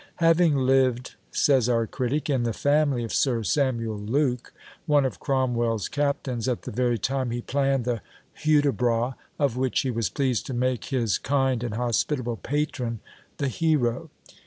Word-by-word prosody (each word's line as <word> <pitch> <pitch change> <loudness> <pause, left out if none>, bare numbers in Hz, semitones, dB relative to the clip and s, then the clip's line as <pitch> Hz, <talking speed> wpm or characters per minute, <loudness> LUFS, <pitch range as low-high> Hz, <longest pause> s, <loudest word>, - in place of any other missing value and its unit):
"Having 165 -2 +4
lived," 130 -1 +2 0.2
says 130 -4 +3
our 115 -1 +2
critic, 130 +6 -2
"in 135 -4 +1
the 115 -1 -1
family 145 -1 +1
of 115 - -5
Sir 120 -5 +1
Samuel 115 -5 0
Luke, 125 +3 -1 0.4
one 145 -2 +4
of 130 - -3
Cromwell's 120 - 0
captains, 140 -4 -1
at 125 -2 -1
the - - -6
very 120 +1 +1
time 130 +3 -1
he 120 +1 -3
planned 135 -1 0
the 120 -4 -1 0.4
Hudibras, 130 -5 +2 0.2
of 140 -5 0
which 130 -1 +1
he 130 - -1
was 115 -5 -1
pleased 130 +1 -1
to 130 - -4
make 125 0 0
his 120 -7 0
kind 135 -3 0
and 115 -3 -3
hospitable 120 +1 -1
patron 130 -5 -2 0.4
the 140 - -1
hero. 145 0 0
130 Hz, 160 wpm, -25 LUFS, 120-140 Hz, 0.4 s, Having